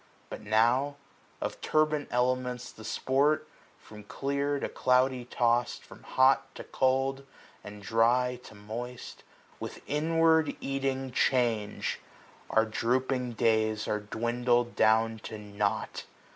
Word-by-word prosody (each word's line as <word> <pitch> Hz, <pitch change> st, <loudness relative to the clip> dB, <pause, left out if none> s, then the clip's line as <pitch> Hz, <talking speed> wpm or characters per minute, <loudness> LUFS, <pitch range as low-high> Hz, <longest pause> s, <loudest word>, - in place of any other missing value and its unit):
But -, -, -6 dB
now, 120 Hz, +7 st, +2 dB, 0.5 s
of -, -, -4 dB
turbid 155 Hz, -1 st, +1 dB
elements 125 Hz, 0 st, -1 dB
the 110 Hz, -, -13 dB
sport, 140 Hz, +7 st, +1 dB, 0.4 s
330 -, -, -21 dB
From 105 Hz, -1 st, -11 dB
clear 140 Hz, +4 st, -1 dB
to -, -, -2 dB
cloudy 125 Hz, -1 st, +1 dB
tost, 120 Hz, 0 st, 0 dB
from -, -, -14 dB
hot 135 Hz, +1 st, +2 dB
to -, -, -7 dB
cold. 135 Hz, +1 st, 0 dB, 0.4 s
And 105 Hz, 0 st, -10 dB
dry 120 Hz, +4 st, +2 dB
to 110 Hz, -, -12 dB
moist, 115 Hz, +4 st, -7 dB, 0.4 s
with -, -, -7 dB
inward 160 Hz, +1 st, +2 dB
eating 135 Hz, -1 st, -2 dB
change. 120 Hz, -5 st, 0 dB, 0.5 s
Our 110 Hz, 0 st, +3 dB
drooping 125 Hz, +2 st, -1 dB
days 110 Hz, -1 st, +1 dB
are 105 Hz, -, 0 dB
dwindled 120 Hz, +3 st, 0 dB
down 110 Hz, 0 st, +3 dB
to 110 Hz, -, -6 dB
nought. 105 Hz, 0 st, -3 dB
125 Hz, 120 wpm, -29 LUFS, 110-135 Hz, 0.5 s, Our